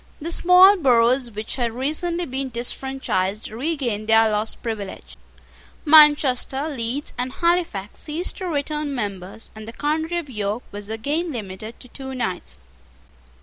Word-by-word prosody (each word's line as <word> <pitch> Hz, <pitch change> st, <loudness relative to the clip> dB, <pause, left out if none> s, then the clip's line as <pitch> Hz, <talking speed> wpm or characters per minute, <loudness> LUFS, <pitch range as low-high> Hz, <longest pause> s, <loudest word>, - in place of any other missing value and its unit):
The 330 Hz, +2 st, -4 dB
small 365 Hz, +4 st, +7 dB
boroughs 250 Hz, -3 st, +3 dB
which 215 Hz, +2 st, -5 dB
had 235 Hz, -3 st, -1 dB
recently 335 Hz, +7 st, -1 dB
been 265 Hz, -1 st, -4 dB
disfranchised 235 Hz, -5 st, -2 dB
regained 240 Hz, -4 st, -2 dB
their 225 Hz, 0 st, +5 dB
lost 210 Hz, +1 st, -2 dB
privilege: 215 Hz, -4 st, -6 dB, 0.7 s
Manchester, 295 Hz, -2 st, +5 dB
Leeds, 260 Hz, +1 st, -3 dB
and 250 Hz, +1 st, -1 dB
Halifax 335 Hz, -, -1 dB
ceased 325 Hz, +4 st, -3 dB
to 375 Hz, -, -4 dB
return 300 Hz, -2 st, -2 dB
members; 200 Hz, -2 st, -5 dB
and 220 Hz, 0 st, -10 dB
the 230 Hz, -, -7 dB
county 315 Hz, +5 st, -1 dB
of 340 Hz, -3 st, -4 dB
York 210 Hz, -1 st, -3 dB
was 205 Hz, 0 st, -6 dB
again 290 Hz, +10 st, -2 dB
limited 215 Hz, -1 st, -7 dB
to -, -, -10 dB
two 265 Hz, +1 st, -8 dB
knights. 185 Hz, -, -3 dB
255 Hz, 140 wpm, -22 LUFS, 220-300 Hz, 0.7 s, small